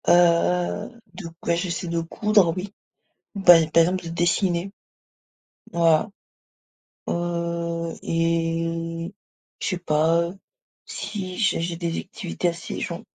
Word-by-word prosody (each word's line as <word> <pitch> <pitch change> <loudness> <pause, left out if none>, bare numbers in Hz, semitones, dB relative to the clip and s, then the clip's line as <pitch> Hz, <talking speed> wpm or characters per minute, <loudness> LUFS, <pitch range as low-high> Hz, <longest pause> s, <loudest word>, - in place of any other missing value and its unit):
Heu, 175 +3 +3 0.2
de 175 -1 -7 0.2
ben, 170 - +2
j'essaie 175 +1 -3
de 170 0 -1
coudre, 200 +1 +2
oui. 195 +2 -5 0.6
Bah 195 -3 +8
à 165 -1 +4
terme 165 +3 +3
de 175 - -8
dessiner. 175 +2 0 1.0
Voilà, 165 +3 +3 1.0
heu 170 -1 -2
et 165 +1 -1 0.5
je - - -1
sais 185 - 0
pas, 165 0 +2
heu, 175 +3 -6 0.5
si 185 -3 -5
j'ai 210 -6 +2
j'ai 170 0 -2
des 170 -1 -2
activités, 180 -1 -4
assez 170 -1 -4
genre 170 -4 -4
170 Hz, 120 wpm, -24 LUFS, 165-180 Hz, 1.0 s, Bah